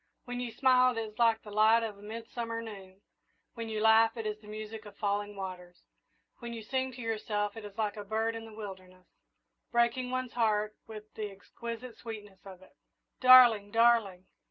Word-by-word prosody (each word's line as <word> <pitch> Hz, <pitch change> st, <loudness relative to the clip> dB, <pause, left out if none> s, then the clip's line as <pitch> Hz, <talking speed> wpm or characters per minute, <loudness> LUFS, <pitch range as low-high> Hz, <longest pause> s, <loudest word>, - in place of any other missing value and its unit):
When 245 Hz, 0 st, -5 dB
you 245 Hz, -1 st, -4 dB
smile 255 Hz, -1 st, +4 dB
it 225 Hz, -, -1 dB
is 215 Hz, +1 st, -10 dB
like 230 Hz, -1 st, +3 dB
the 210 Hz, -, -10 dB
light 220 Hz, +2 st, +4 dB
of 220 Hz, -2 st, -4 dB
a -, -, -15 dB
midsummer 230 Hz, +2 st, -5 dB
noon; 195 Hz, -4 st, -10 dB, 0.5 s
when 230 Hz, -1 st, -6 dB
you 215 Hz, -1 st, -2 dB
laugh 225 Hz, +1 st, +5 dB
it 225 Hz, -, -4 dB
is 210 Hz, 0 st, -3 dB
the 210 Hz, -, -16 dB
music 215 Hz, +1 st, -7 dB
of 205 Hz, -, -14 dB
falling 205 Hz, 0 st, -2 dB
waters; 180 Hz, -2 st, -8 dB, 0.6 s
when 235 Hz, -1 st, -7 dB
you 225 Hz, -1 st, -7 dB
sing 260 Hz, +3 st, -2 dB
to 245 Hz, -, -9 dB
yourself 210 Hz, -2 st, -2 dB
it 225 Hz, -, -8 dB
is 205 Hz, -1 st, -11 dB
like 215 Hz, -1 st, -1 dB
a 205 Hz, -, -5 dB
bird 220 Hz, +2 st, -1 dB
in 225 Hz, 0 st, -7 dB
the 225 Hz, -, -11 dB
wilderness, 185 Hz, -3 st, -10 dB, 0.7 s
breaking 235 Hz, +1 st, +1 dB
one's 255 Hz, -1 st, -3 dB
heart 215 Hz, -2 st, +1 dB
with 215 Hz, -1 st, -10 dB
the 215 Hz, -1 st, -4 dB
exquisite 230 Hz, +4 st, -8 dB
sweetness 205 Hz, -4 st, -9 dB
of 190 Hz, -1 st, -12 dB
it. -, -, -21 dB, 0.4 s
Darling! 245 Hz, -5 st, +8 dB
darling!" 225 Hz, -5 st, +3 dB
220 Hz, 190 wpm, -31 LUFS, 205-230 Hz, 0.7 s, Darling